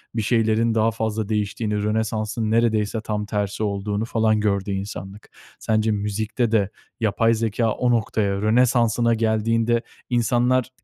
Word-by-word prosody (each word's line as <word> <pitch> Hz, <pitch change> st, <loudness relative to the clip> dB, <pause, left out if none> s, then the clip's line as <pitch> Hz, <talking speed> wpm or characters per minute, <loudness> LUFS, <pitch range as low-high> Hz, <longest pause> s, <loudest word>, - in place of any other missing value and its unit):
bir 110 Hz, -, 0 dB
şeylerin 115 Hz, 0 st, +1 dB
daha 110 Hz, 0 st, +3 dB
fazla 110 Hz, -1 st, -3 dB
değiştiğini, 105 Hz, 0 st, -1 dB
Rönesans'ın 110 Hz, +1 st, -1 dB
neredeyse 110 Hz, -1 st, +1 dB
tam 105 Hz, -1 st, -3 dB
tersi 105 Hz, 0 st, -2 dB
olduğunu 100 Hz, +1 st, -2 dB
falan 110 Hz, -2 st, +1 dB
gördü 100 Hz, -1 st, 0 dB
insanlık. 95 Hz, +1 st, -6 dB, 0.3 s
Sence 110 Hz, 0 st, +1 dB
müzikte 110 Hz, +3 st, -1 dB
de 100 Hz, -4 st, +2 dB, 0.3 s
yapay 115 Hz, +1 st, +2 dB
zekâ 115 Hz, 0 st, 0 dB
o 125 Hz, +2 st, 0 dB
noktaya, 100 Hz, -3 st, 0 dB
Rönesans'ına 115 Hz, +1 st, +3 dB
geldiğinde 115 Hz, +1 st, +1 dB, 0.3 s
insanlar 120 Hz, +1 st, +2 dB
110 Hz, 125 wpm, -22 LUFS, 105-115 Hz, 0.3 s, daha